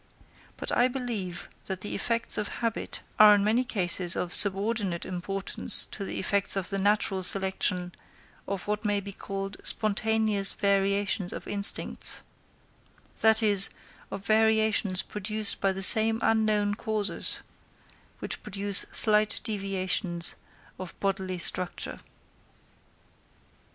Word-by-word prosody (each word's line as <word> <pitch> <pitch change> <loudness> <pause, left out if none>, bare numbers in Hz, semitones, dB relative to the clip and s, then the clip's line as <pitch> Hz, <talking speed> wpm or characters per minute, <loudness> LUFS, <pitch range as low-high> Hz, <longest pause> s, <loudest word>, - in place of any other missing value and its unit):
But - - -6
I 245 - +2
believe 235 -9 -6 0.2
that 190 -1 -7
the 205 - -6
effects 230 +2 -1
of 210 - -4 0.2
habit 230 -2 -5 0.2
are 210 -1 +7
in 200 - -1
many 225 +4 0
cases 185 -6 +1
of 175 - -5
subordinate 200 -2 +4
importance 190 +2 +3
to 200 - -7
the - - -6
effects 200 +1 -1
of 195 0 -4
the 195 - -3
natural 200 -1 -1
selection 185 -1 -2 0.5
of 195 -2 -6
what 210 +1 -4
may 205 -1 -1
be 200 0 -10
called 195 +1 -8
spontaneous 215 -1 -1
variations 200 -1 -1
of - - -10
instincts;—that 220 +2 0
is 200 -2 +2 0.4
of 195 0 -9
variations 220 -3 +1
produced 210 +1 -2
by 195 - +1
the 190 0 -3
same 220 +3 +8
unknown 215 -2 0
causes 215 -1 -3 0.8
which - - -7
produce 200 0 -2
slight 215 -1 +5
deviations 190 -4 -2 0.5
of 185 -2 -10
bodily 190 -2 -4
structure. 175 +1 -2
200 Hz, 120 wpm, -26 LUFS, 190-215 Hz, 0.8 s, same